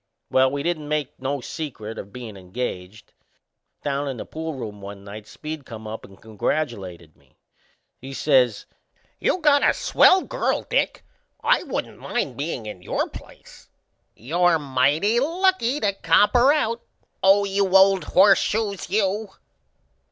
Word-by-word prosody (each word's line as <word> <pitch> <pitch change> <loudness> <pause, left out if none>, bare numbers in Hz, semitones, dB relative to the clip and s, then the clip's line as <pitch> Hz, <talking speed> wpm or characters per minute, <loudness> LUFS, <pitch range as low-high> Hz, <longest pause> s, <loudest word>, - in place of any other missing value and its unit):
Well, 130 0 +4
we 140 +1 -3
didn't 160 -3 -2
make 150 -2 -2
no 135 +1 -2
secret 120 -7 -6
o' - - -4
bein' 110 +1 -10
engaged; 95 0 -6 0.7
down 140 0 -1
in 135 -2 -4
the - - -6
poolroom 135 -10 -6
one 100 0 -9
night 105 +1 -10
Speed 155 +6 -7
come 110 -3 -10
up 110 +1 -7
and 95 - -17
congratulated 100 - -4
me. 70 -2 -30 0.6
He 135 +2 -9
says: 130 -5 +2 0.5
"You - - +1
got 290 -2 +5
a - - +4
swell 370 0 +4
girl, - - -1
Dick! - - 0 0.4
I 465 +2 +3
wouldn't - - -5
mind 145 - -3
bein' 140 -4 -4
in 105 -4 -8
your - - -2
place. - - -14 0.5
You're 170 +7 +2
mighty 145 - +2
lucky 330 -3 +1
to 205 -6 +1
cop 180 +2 +3
her 250 +3 +6
out 235 -6 0 0.6
you 195 -1 +3
old 190 0 +4
Horseshoes, 200 +1 +3
you!" 205 +1 0
150 Hz, 140 wpm, -23 LUFS, -, 0.7 s, her